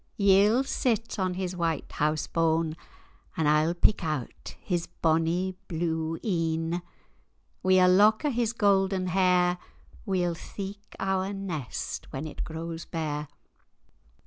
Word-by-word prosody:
Ye'll 205 +5 +5
sit 230 -5 -1
on 185 -1 0
his 185 -1 -3
white 165 -3 -2
hause 150 +1 0
bane,[#] 165 -1 +1 0.6
And 160 -3 +2
I'll 155 +3 +3
pick 185 +2 +2
out 155 -6 -4
his 175 -3 -2
bonny 165 +3 +1
blue 160 -1 -2
een: 165 -2 0 0.8
Wi' 185 0 +4
ae 180 - +6
lock 210 +8 +5
o' 295 - +2
his 235 -2 0
gowden 195 -4 +2
hair, 180 -1 +3 0.4
We'll 180 -5 0
theek[#] 200 +4 -8
our 190 0 -1
nest 175 - -5
when 135 +3 -4
it 150 - -5
grows 165 0 -5
bare. 150 -2 -3
180 Hz, 125 wpm, -28 LUFS, 160-195 Hz, 0.8 s, ae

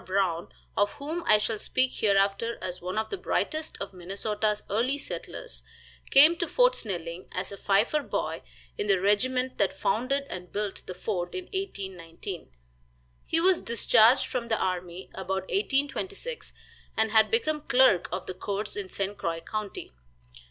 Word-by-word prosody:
Brown, 185 -3 0 0.2
of 205 0 +2
whom 315 +5 -4
I 215 - +7
shall 215 0 -1
speak 255 +3 +1
hereafter 200 +2 +2
as 180 0 -5
one 185 +3 -4
of 220 0 -1
the 400 - -2
brightest 315 0 -1
of 200 0 -5
Minnesota's 205 +4 -1
early 240 +7 +1
settlers, - - -6 0.5
came 300 +5 +8
to 345 - -1
Fort - - +4
Snelling 175 - -5
as 185 +2 -3
a - - -5
fifer 205 +10 +2
boy - - -2 0.4
in 205 - -1
the 195 -2 +4
regiment 250 +6 +1
that 195 -1 +1
founded 255 +9 0
and 180 -5 -7
built 205 -1 -3
the 185 - -6
fort 180 -2 -3
in 370 - -3
1819. 190 - -6 0.8
He 330 - +2
was 365 +1 +4
discharged 230 +2 +5
from 245 -3 -3
the 225 -1 +1
army 180 -1 -3
about 190 0 -3
1826, 390 - -1 0.5
and 220 0 +2
had 220 -1 +5
become 310 -10 +1
clerk 250 - +4
of 185 - -3
the - - -4
courts 200 +3 -4
in 200 -2 -4
St. 195 +2 -2
Croix 165 -4 -2
county. 210 +3 -5
210 Hz, 160 wpm, -28 LUFS, 190-270 Hz, 0.8 s, came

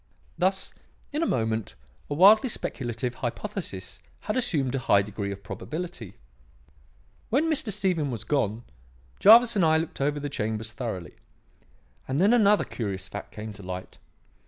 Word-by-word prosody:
"Thus, 190 +1 0 0.4
in 300 - -1
a 330 - +1
moment, 110 - -1 0.3
a 145 - -2
wildly 210 - +7
speculative 120 - -3
hypothesis 125 - -5 0.2
had 210 - -3
assumed 150 - +1
a 135 - 0
high 100 -5 +3
degree 100 0 -4
of 100 0 -8
probability. 150 - -6 1.1
"When 275 +7 +2
Mr. 290 -8 0
Stephen 185 -7 0
was 115 -4 -4
gone, 115 -4 -1 0.6
Jervis 230 +2 +8
and 195 - +3
I 160 -1 +4
looked 160 -2 -4
over 145 +1 0
the 145 - -3
chambers 110 -3 -3
thoroughly; 110 -8 -5 0.9
and 135 +2 -1
then 200 +6 +5
another 210 -3 +5
curious 100 -4 -4
fact 105 - -8
came 105 0 -7
to 105 - -11
light. 90 -1 -7
135 Hz, 150 wpm, -26 LUFS, -, 1.1 s, Jervis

